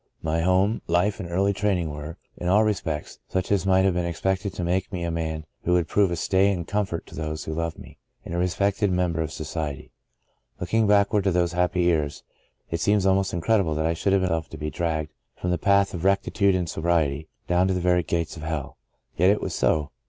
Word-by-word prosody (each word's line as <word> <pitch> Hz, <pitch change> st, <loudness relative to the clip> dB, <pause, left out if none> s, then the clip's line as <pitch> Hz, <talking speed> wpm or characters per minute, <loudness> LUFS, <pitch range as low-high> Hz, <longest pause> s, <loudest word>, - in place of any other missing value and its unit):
My 80 Hz, +1 st, 0 dB
home, 95 Hz, +5 st, +2 dB
life 90 Hz, +5 st, +1 dB
and 90 Hz, -4 st, -5 dB
early 95 Hz, +3 st, +1 dB
training 95 Hz, -5 st, 0 dB
were, 75 Hz, +2 st, -7 dB, 0.2 s
in 90 Hz, -, -5 dB
all 105 Hz, +4 st, +5 dB
respects, 80 Hz, -8 st, -2 dB
such 95 Hz, +1 st, -2 dB
as 100 Hz, -2 st, +1 dB
might 95 Hz, 0 st, +4 dB
have 95 Hz, -, +3 dB
been 90 Hz, 0 st, 0 dB
expected 95 Hz, +3 st, -1 dB
to 90 Hz, -, -3 dB
make 90 Hz, +2 st, -1 dB
me 90 Hz, -3 st, -3 dB
a 85 Hz, -, -1 dB
man 80 Hz, -1 st, -3 dB, 0.2 s
who 90 Hz, -, +1 dB
would 90 Hz, -2 st, +2 dB
prove 100 Hz, -2 st, +3 dB
a 85 Hz, -, -1 dB
stay 95 Hz, +3 st, +2 dB
and 85 Hz, -3 st, -3 dB
comfort 100 Hz, -5 st, -2 dB
to -, -, -15 dB
those 80 Hz, -1 st, -4 dB
who 80 Hz, -, -4 dB
loved 85 Hz, 0 st, -3 dB
me, -, -, -13 dB, 0.3 s
and -, -, -6 dB
a 85 Hz, -, -1 dB
respected 100 Hz, +2 st, +1 dB
mem 90 Hz, -1 st, +1 dB
ber 80 Hz, -, -1 dB
of 80 Hz, -1 st, -3 dB
society. 75 Hz, -2 st, -5 dB, 0.7 s
Looking 110 Hz, +5 st, +1 dB
backward 100 Hz, 0 st, +3 dB
to 95 Hz, -, +3 dB
those 85 Hz, -1 st, +1 dB
happy 90 Hz, 0 st, +1 dB
years, 75 Hz, -4 st, 0 dB, 0.5 s
it 85 Hz, 0 st, -2 dB
seems 105 Hz, -2 st, +2 dB
almost 95 Hz, 0 st, +2 dB
incredible 85 Hz, -2 st, +1 dB
that 80 Hz, +1 st, 0 dB
I 80 Hz, -, +2 dB
should 95 Hz, +4 st, 0 dB
have 95 Hz, -1 st, +3 dB
allowed 95 Hz, -, +1 dB
myself 80 Hz, -1 st, -2 dB
to 80 Hz, -, -8 dB
be 75 Hz, +1 st, -4 dB
dragged 80 Hz, -3 st, -2 dB, 0.3 s
from 90 Hz, -, -1 dB
th& 90 Hz, -, -1 dB
path 100 Hz, 0 st, +3 dB
of 85 Hz, -2 st, -5 dB
rectitude 100 Hz, 0 st, +2 dB
and 90 Hz, -2 st, -1 dB
sobriety, 80 Hz, -3 st, 0 dB, 0.2 s
down 90 Hz, +1 st, +3 dB
to 95 Hz, -, +1 dB
the -, -, 0 dB
very 90 Hz, 0 st, +3 dB
gates 85 Hz, 0 st, -2 dB
of 80 Hz, -, -9 dB
hell. 80 Hz, -3 st, -4 dB, 0.4 s
Yet 90 Hz, +3 st, +5 dB
it 105 Hz, -, +3 dB
was -, -, -4 dB
so. 75 Hz, -2 st, +1 dB
90 Hz, 230 wpm, -25 LUFS, 80-95 Hz, 0.7 s, all